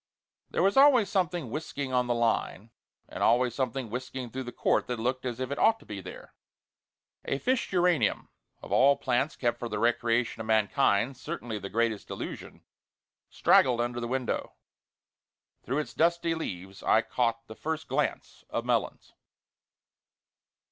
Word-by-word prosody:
There - - 0
was 195 +6 +3
always 265 -8 +6
something 175 - -1
whisking 140 -2 -4
on 125 -1 +2
the 120 - +1
line, 115 -2 -1 0.4
and - - -8
always 120 +1 +3
something 130 -2 -3
whisking 125 0 -5
through 130 +1 -5
the 120 - -6
court - - +1
that 125 - -2
looked 125 +2 -1
as 120 -1 -4
if 130 +1 -3
it 140 - -3
ought 225 0 +4
to - - -18
be 100 -2 -6
there. 90 - -11 0.9
A 140 - -1
fish 255 - 0
geranium 180 -3 +1 0.3
of - - -10
all 140 +2 +5
plants 130 +4 0
kept 120 -2 -1
for 120 - -4
the 105 - -3
recreation 115 +1 +1
of 110 - -7
mankind, 110 +3 +2
certainly 115 -3 -5
the 100 - -7
greatest 115 -1 -1
illusion - - -7 0.7
straggled 125 -2 +4
under 120 0 -1
the 120 - -3
window. 130 0 -2 1.1
Through 135 - -2
its 150 - -3
dusty 170 0 +2
leaves 95 - -6
I 110 - +3
caught 115 -2 -1
the 110 - -10
first 160 +6 -4
glance - - -2
of - - -3
Melons. - - -1
125 Hz, 160 wpm, -28 LUFS, 115-140 Hz, 1.1 s, always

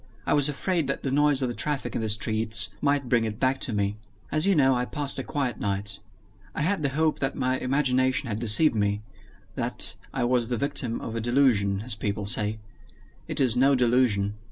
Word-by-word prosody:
I - - +1
was 145 0 +3
afraid 165 +1 -1
that 140 - -3
the 135 - -1
noise 145 -1 +3
of - - +1
the 120 - -3
traffic 145 +2 -1
in - - -1
the 110 - -2
streets 110 +1 +1
might 140 -2 +1
bring 120 -1 +2
it 110 -1 -4
back 130 0 +1
to - - -2
me. 100 -1 -1 0.3
As 155 +4 +2
you 200 - +4
know, 135 -3 +4
I 125 -1 0
passed 140 +1 -2
a - - -3
quiet 135 -3 -3
night. 100 0 -2 0.6
I 155 - -1
had 190 +2 0
the 140 - +1
hope 155 +3 0
that 135 - -1
my 130 0 0
imagination 130 0 +1
had 105 -2 -3
deceived 120 +6 +4
me 105 -1 -1 0.5
that - - 0 0.2
I - - -2
was 120 -1 +1
the 120 0 -2
victim 135 -3 -2
of 115 - -6
a 115 - -2
delusion, 110 -5 +2
as 125 - 0
people 105 -1 -3
say. 105 0 0 0.7
It - - -2
is 125 -4 +3
no 135 +2 +4
delusion. 120 -5 +2
125 Hz, 210 wpm, -26 LUFS, 110-140 Hz, 0.7 s, you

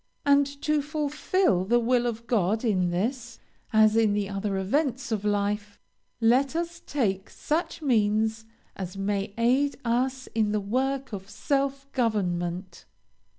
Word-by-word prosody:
And, 285 0 +5 0.2
to 300 -1 +2
fulfill 300 - 0
the 235 +6 +3
will 240 +1 +2
of 230 0 -4
God 220 0 +1
in 185 -5 +2
this, 230 +6 -2 0.3
as 215 0 +5
in 220 -2 +3
the 205 -1 -1
other 195 0 -2
events 260 +6 -1
of 210 -2 -1
life, 205 0 -1 0.4
let 255 +6 +3
us 340 0 -3
take 195 -9 -1
such 320 +1 -2
means 220 -3 +1 0.3
as 190 0 -6
may 200 0 -1
aid 260 +5 +2
us 255 +3 0
in 215 -2 +1
the 210 - +1
work 260 +5 -1
of 195 0 -6
self 275 +1 -1
government. 180 -6 -2
225 Hz, 140 wpm, -27 LUFS, 205-270 Hz, 0.4 s, And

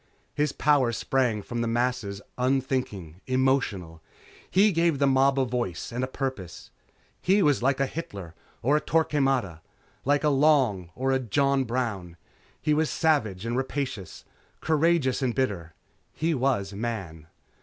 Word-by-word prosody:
His 150 -1 0
power 140 -5 +2
sprang 120 -3 0
from 120 +2 -4
the 115 - -1
masses 115 -4 -1
unthinking, 125 - -2
emotional. 130 -11 0 0.5
He 205 +3 +4
gave 165 -3 +2
the 140 - +2
mob 135 0 +3
a 130 - +2
voice 120 -8 -3
and 120 +2 -3
a - - 0
purpose. 130 - -5 0.5
He 195 +2 +3
was 145 -5 +3
like 135 +2 +1
a 135 - +3
Hitler 100 - -7 0.3
or 140 +5 +3
a 150 - +2
Torquemada. 135 - 0 0.4
Like 145 +2 +2
a 150 - +4
Long 135 - +3
or 135 +1 0
a 130 - +2
John 135 +2 +1
Brown. 110 -8 -3 0.4
He 150 - +1
was 155 +1 +1
savage 115 - 0
and 115 +1 -2
rapacious, 130 - -4 0.3
courageous 155 -4 +2
and 125 -3 0
bitter. 95 -12 -2 0.4
He 165 +1 0
was 125 -8 0
Man. 100 -8 -5
130 Hz, 145 wpm, -26 LUFS, 105-140 Hz, 0.5 s, He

